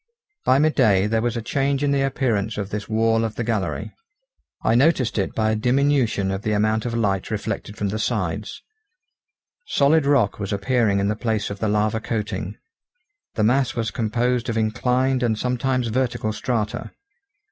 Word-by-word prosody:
By 130 - +5
mid 155 +2 +3
day 100 -7 +3
there 110 +1 +1
was 120 0 -1
a 115 - -4
change 140 +3 0
in 145 - +2
the 140 -1 +2
appearance 120 -6 0
of 100 -1 -4
this 105 +1 -4
wall 115 +1 +2
of 110 -1 -3
the 120 - -2
gallery. 95 - -2 0.7
I - - +3
noticed 130 -3 +3
it 95 - -2
by 110 -1 +1
a - - +1
diminution 125 -4 +1
of 95 0 -3
the 105 0 -1
amount 110 +2 +1
of 115 - -3
light 100 -5 0
reflected 105 -1 -4
from 100 - -1
the 110 +2 -3
sides; 105 -3 -2 1.0
solid 145 +1 +3
rock 130 -10 +2
was 100 -2 -4
appearing 100 0 +1
in 100 - +1
the 105 - 0
place 110 -2 -2
of 100 - -6
the 110 - 0
lava 105 +1 +1
coating. 110 -1 -4 0.8
The 110 - +1
mass 130 +4 +2
was 115 -3 -1
composed 120 +3 0
of 115 - -1
inclined 125 +4 +1
and 115 -3 +1
sometimes 125 0 0
vertical 120 -2 -1
strata. 110 -2 -2
115 Hz, 180 wpm, -22 LUFS, 105-125 Hz, 1.0 s, By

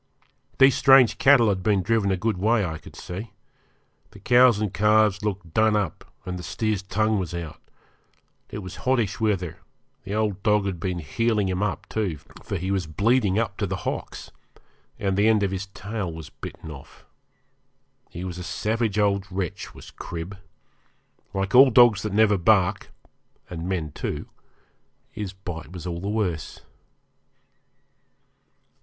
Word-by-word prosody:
These 135 0 +7
strange 135 -3 +6
cattle 135 -5 +6
had 95 -2 0
been 100 -2 +1
driven 110 0 +1
a 95 - +1
good 105 -1 -1
way, 110 +1 +2
I 80 -2 -5
could - - -14
see. 100 +6 -7 0.8
The 105 - -15
cows 120 +1 +5
and 105 -3 -2
calves 105 0 +3
looked 95 -6 -4
done 110 +1 +3
up, 100 -7 -3
and 90 0 -4
the - - -6
steer's 105 +3 -2
tongue 105 +2 0
was 90 -2 -4
out 85 -3 -7 0.9
it 105 - -6
was 90 - -8
hottish 120 -6 0
weather; 100 -6 -1 0.4
the 100 - -4
old 105 -3 -1
dog 105 -1 +2
had 95 -4 -3
been 90 0 -2
'heeling' 105 +6 0
him 95 +1 -2
up 105 - -2
too, 100 -8 -2 0.2
for 100 - -4
he 95 +2 -3
was 95 -4 -1
bleeding 105 +4 +2
up 110 -3 -1
to 100 - -1
the 100 - -2
hocks, - - -5 0.7
and 95 -1 -1
the 105 +2 +3
end 110 -2 +3
of 100 - 0
his 95 0 -4
tail 100 -1 -5
was 80 -2 -9
bitten 80 - -9
off. 70 -2 -13 1.0
He 85 - -7
was 90 -1 -5
a - - -5
savage 110 +3 -1
old 100 -2 +1
wretch 90 -2 -4
was - - -12
Crib. 85 +3 -7 1.0
Like 95 0 -2
all 130 +2 +9
dogs 120 -4 +6
that 105 - -3
never 105 -1 +3
bark 100 +1 +2 0.6
and 85 +1 -5
men 85 -6 -2
too - - -5 0.8
his 105 -3 -5
bite 90 -4 -8
was 90 -2 -8
all 85 -1 -4
the 100 - -3
worse. 95 -9 -2
100 Hz, 160 wpm, -24 LUFS, 90-110 Hz, 1.0 s, all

